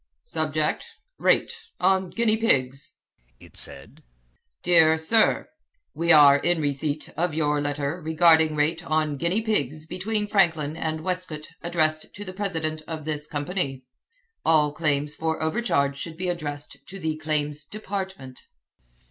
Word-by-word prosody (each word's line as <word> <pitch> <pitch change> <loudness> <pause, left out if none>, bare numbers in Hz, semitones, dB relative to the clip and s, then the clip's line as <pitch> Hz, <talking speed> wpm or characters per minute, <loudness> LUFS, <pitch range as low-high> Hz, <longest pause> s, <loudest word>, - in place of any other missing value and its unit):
"Subject 155 -1 -1 0.4
Rate - - +3 0.3
on 190 -1 +2
guinea 225 +1 +1
pigs," 135 - 0 0.4
it - - -16
said, - - -5 0.6
"Dr. 165 -2 +5
Sir 220 +8 +2 0.4
We 170 +2 +2
are 145 -3 +8
in 175 +3 +1
receipt 145 +1 -2
of 170 -2 -1
your 150 -2 +1
letter 145 +3 -2
regarding 160 0 +4
rate 160 +3 0
on 155 -3 0
guinea 175 +8 0
pigs 155 - -1
between 210 +5 -2
Franklin 165 -7 +2
and 160 -1 -3
Westcote 180 -4 -4
addressed 155 -2 -1
to 205 - -7
the 185 - -7
president 160 -6 -3
of 160 -2 -6
this 150 -1 -3
company. 145 -3 -3 0.6
All 150 -2 +3
claims 150 -2 0
for 160 +1 -2
overcharge 155 -5 0
should 160 +1 -6
be 180 0 -2
addressed 145 -4 -5
to 195 - -8
the 160 -3 -2
Claims 150 -1 -2
Department." 190 -8 -6
160 Hz, 135 wpm, -25 LUFS, 150-180 Hz, 0.6 s, are